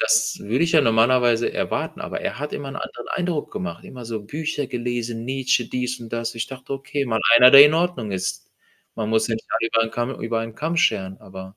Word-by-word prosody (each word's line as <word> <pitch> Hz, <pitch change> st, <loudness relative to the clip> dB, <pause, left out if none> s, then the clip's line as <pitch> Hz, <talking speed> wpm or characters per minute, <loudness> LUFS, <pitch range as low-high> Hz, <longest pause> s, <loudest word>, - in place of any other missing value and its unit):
Das 110 Hz, 0 st, +2 dB
würde 120 Hz, +10 st, 0 dB
ich 165 Hz, -, -1 dB
ja 160 Hz, -, +6 dB
normalerweise 120 Hz, -1 st, +3 dB
erwarten, -, -, -3 dB
aber -, -, -5 dB
er -, -, -4 dB
hat 150 Hz, +1 st, -5 dB
immer 140 Hz, -1 st, -5 dB
'n 135 Hz, -, -7 dB
anderen -, -, -7 dB
Eindruck 175 Hz, -5 st, -2 dB
gemacht. 85 Hz, -2 st, -6 dB
Immer 125 Hz, -2 st, -10 dB
so 110 Hz, -1 st, -5 dB
Bücher 145 Hz, +5 st, -4 dB
gelesen, 120 Hz, -2 st, -4 dB
Nietzsche, 130 Hz, -1 st, 0 dB
dies 125 Hz, 0 st, -3 dB
und 115 Hz, -1 st, -11 dB
das. 115 Hz, 0 st, -3 dB
Ich 115 Hz, -1 st, -3 dB
dachte: 135 Hz, 0 st, -9 dB
„Okay, 135 Hz, +1 st, -3 dB
mal 110 Hz, -3 st, -1 dB, 0.2 s
einer, 125 Hz, +1 st, +9 dB
der 140 Hz, +1 st, +11 dB
in 150 Hz, +1 st, +4 dB
Ordnung 165 Hz, -, -1 dB
ist.“ 95 Hz, 0 st, -4 dB, 0.4 s
Man 110 Hz, -2 st, -3 dB
muss 110 Hz, +1 st, +2 dB
ja 115 Hz, -, 0 dB
nicht 110 Hz, -, -7 dB
alle 115 Hz, -, 0 dB
über 115 Hz, 0 st, +2 dB
'n 115 Hz, -, -6 dB
Kamm 120 Hz, +3 st, -4 dB
über 115 Hz, 0 st, -2 dB
einen 115 Hz, -1 st, -6 dB
Kamm 160 Hz, +7 st, -3 dB
scheren. 95 Hz, -, +1 dB
Aber, 95 Hz, +1 st, -11 dB
120 Hz, 230 wpm, -22 LUFS, 110-135 Hz, 0.4 s, der